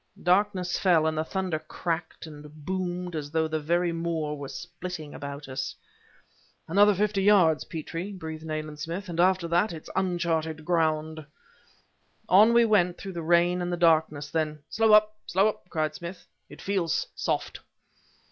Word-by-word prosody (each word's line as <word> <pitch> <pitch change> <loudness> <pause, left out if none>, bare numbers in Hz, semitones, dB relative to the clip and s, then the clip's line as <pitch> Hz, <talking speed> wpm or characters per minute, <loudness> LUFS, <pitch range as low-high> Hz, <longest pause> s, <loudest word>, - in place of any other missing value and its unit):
Darkness 185 0 +2
fell, 170 -5 +4
and 160 0 0
the 155 - 0
thunder 185 -2 -2
cracked 165 +1 -4
and 150 -1 -12
boomed 180 -1 -3
as 145 -2 -4
though 160 +1 0
the 155 0 -2
very 170 +3 +1
moor 165 -2 -2
were 140 -1 -7
splitting 170 -1 -7
about 140 0 -7
us. 130 0 -4 0.9
"Another 205 +4 +5
fifty 205 0 +1
yards, 190 -6 +4
Petrie," 165 +3 -5
breathed 160 -4 -7
Nayland 155 -1 -5
Smith, 170 +5 -5
"and 170 -1 -5
after 185 -1 +3
that 175 +6 +2
it's 160 -2 -9
unchartered 165 -4 -1
ground." 155 -2 0 1.0
On 210 +5 +6
we 235 0 +5
went 180 -5 +2
through 195 -1 -7
the 170 - -4
rain 175 +2 +3
and 175 0 -2
the 175 - -1
darkness; 155 -3 +2
then: 155 -2 -2
"Slow 225 0 +2
up! 215 0 +5
slow 195 +3 +3
up!" 210 -4 -5
cried 155 -2 -1
Smith. 175 +2 -8 0.2
"It - - -12
feels 190 -5 0
soft!" - - -2
170 Hz, 160 wpm, -27 LUFS, 155-185 Hz, 1.0 s, On